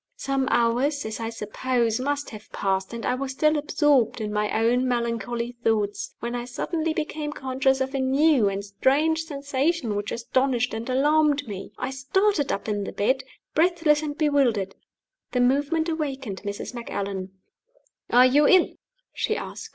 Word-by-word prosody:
Some 270 -1 -1
hours, 245 +5 +1
as 220 +1 -4
I 225 0 -3
suppose, 230 +1 -1
must 285 +2 -2
have 215 -2 -11
passed, 190 -1 -1
and 235 -1 -5
I - - +1
was 265 +1 -3
still 305 +3 +3
absorbed 295 -5 +2
in 210 -1 -3
my 210 0 0
own 240 +3 +2
melancholy 235 -1 -1
thoughts, 210 -2 0
when 235 +1 -3
I 240 0 -3
suddenly 315 +6 -2
became 305 -1 -3
conscious 265 -1 0
of 265 +1 -1
a 275 - -1
new 265 -3 +3
and 195 +1 -4
strange 300 +10 +1
sensation 280 -4 -1
which 205 0 -3
astonished 245 +1 0
and 225 +3 -4
alarmed 290 +1 +3
me. 200 -2 -7
I 255 +1 -3
started 290 +5 +1
up 200 - -3
in 205 -1 -1
the - - -5
bed, 260 +6 0 0.3
breathless 325 -2 +3
and 295 -1 -4
bewildered. 255 - +2 0.6
The 250 - +1
movement 285 +6 +2
awakened 275 - -3
Mrs. 205 +4 -5
Macallan. 195 -5 -4 0.8
"Are 250 +1 +7
you 285 +3 +5
ill?" 370 -2 +5 0.4
she - - -1
asked. 450 - -7
260 Hz, 160 wpm, -25 LUFS, 225-290 Hz, 0.8 s, Are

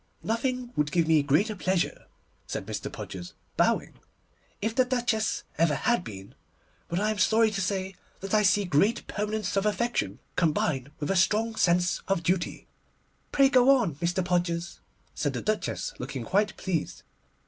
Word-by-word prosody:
'Nothing 245 +2 -2
would 150 0 0
give 170 -3 +2
me 160 -2 +5
greater 155 +10 +2
pleasure,' 185 -1 -1 0.4
said - - -4
Mr. - - -5
Podgers, 90 -2 -8 0.2
bowing, - - +1 0.6
'if 220 +2 -1
the 255 - +4
Duchess 240 -3 0 0.2
ever 165 -3 +3
had 240 - +1
been, 95 - -9 0.5
but 170 - -1
I 210 +1 +1
am 215 - -4
sorry 220 0 +4
to 195 -2 -2
say 190 0 -2 0.3
that 195 +1 -6
I 215 - +5
see 205 0 +3
great 190 +8 +2
permanence 210 -2 -2
of 195 - +1
affection, 210 - -1 0.2
combined 145 -5 +1
with 150 +4 -1
a - - +1
strong 215 +5 +2
sense 175 -2 +2
of 195 -3 0
duty.' 175 +1 -1 0.7
'Pray 275 -1 +5
go 265 +1 +6
on, 210 - 0
Mr. 175 +3 0
Podgers,' 175 -1 -1 0.3
said 145 -3 -1
the 125 - -3
Duchess, 120 - -2
looking 130 0 -5
quite 205 +2 +1
pleased. 175 -5 -3
190 Hz, 160 wpm, -27 LUFS, 165-220 Hz, 0.7 s, go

